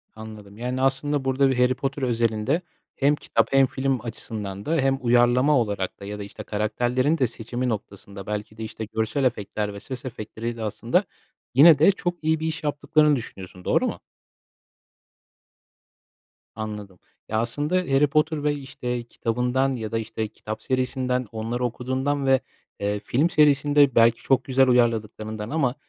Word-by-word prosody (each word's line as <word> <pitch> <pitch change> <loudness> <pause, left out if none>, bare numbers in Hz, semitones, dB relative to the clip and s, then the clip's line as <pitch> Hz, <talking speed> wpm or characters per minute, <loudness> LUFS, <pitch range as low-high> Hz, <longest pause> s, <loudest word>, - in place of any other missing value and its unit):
Anladım. 110 -2 -10
Yani, 125 +2 -3
aslında, 135 +1 0
burada 135 +1 +3
bir 130 - 0
Harry 125 +1 +4
Potter 135 +1 -3
özelinde 115 +5 +1 0.3
hem 140 +2 +3
kitap 115 -5 0
hem 135 0 +6
film 130 -1 -1
açısından 105 -4 -6
da 165 - 0
hem 135 -2 +2
uyarlama 125 +4 +4
olarak 100 -4 -2
da 100 - -9
ya 105 +1 -6
da, - - -4
işte, 105 +2 -9
karakterlerin 120 +8 0
de 130 - +2
seçimi 120 +2 -4
noktasında, 100 -2 -6
belki 105 +1 -5
de, 110 - -5
işte, 110 0 -6
görsel 110 +5 -1
efektler 105 -3 -1
ve 100 - -8
ses 125 +4 -8
efektleriyle, 115 -1 -5
aslında, 120 - 0 0.5
yine 145 +3 +8
de 160 +6 +7
çok 175 -2 -2
iyi 160 0 +2
bir 160 - -2
iş 160 0 -3
yaptıklarını 150 0 +2
düşünüyorsun, 95 -6 -8
doğru - - +2
mu? - - -4 2.6
Anladım. 105 -4 -7 0.3
Ya, 110 - +1
aslında, 145 +9 -1
Harry 150 -5 +3
Potter 155 +1 +1
ve, 150 0 +2
işte, 125 -3 -4
kitabından 125 +3 0
ya 110 -3 -5
da, 115 - 0
işte, 110 0 -4
kitap 110 +1 -8
serisinden, 130 -1 -1
onları 115 +2 -3
okuduğundan 130 +4 -1
ve, 135 0 +4 0.4
eee, 105 0 -1
film 135 +10 +1
serisinde, 145 -3 +4
belki, 115 0 +5
çok 130 -1 +2
güzel 130 +1 +3
uyarladıklarından 110 -3 0
ama 140 -5 0
125 Hz, 160 wpm, -24 LUFS, 110-135 Hz, 2.6 s, yine